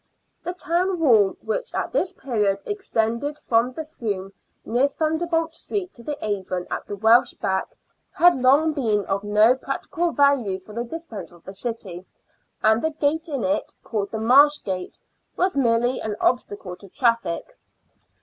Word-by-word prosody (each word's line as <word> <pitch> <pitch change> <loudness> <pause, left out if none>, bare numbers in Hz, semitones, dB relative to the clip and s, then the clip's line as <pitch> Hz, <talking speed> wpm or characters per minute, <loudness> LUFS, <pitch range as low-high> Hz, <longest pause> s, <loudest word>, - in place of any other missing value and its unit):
The 355 - -4
town 360 +2 0
wall, 220 -11 +4
which - - -3
at - - -2
this 375 -7 +1
period 210 - -1
extended 285 - -1
from 235 -2 +1
the 315 +4 -5
Froom 205 - -4 0.3
near 245 +4 +2
Thunderbolt 325 +2 -1
Street 370 +1 -4
to 235 - -12
the 290 +4 -4
Avon 190 -3 -2
at - - -4
the 205 - -4
Welsh 225 +4 +4
Back, 190 0 -1 0.4
had 350 0 +5
long 275 +5 +4
been 220 -8 0
of 195 +1 -1
no 210 +3 +5
practical 325 +6 -2
value 280 -10 +3
for 190 +3 -14
the 235 +2 -2
defence 235 - -8
of 175 -1 -18
the 190 - -9
city, 195 -5 -6 0.6
and 220 +1 +4
the 315 - +1
gate 315 +2 -1
in 275 -5 -2
it, 290 +2 -1
called 205 -3 -2
the 220 - -4
Marsh 280 +7 +5
Gate, 185 -2 -4 0.4
was 370 -1 +1
merely 245 -1 +2
an 215 -1 -3
obstacle 205 -7 -1
to 200 - -14
traffic. 230 - 0
245 Hz, 160 wpm, -23 LUFS, 205-315 Hz, 0.6 s, had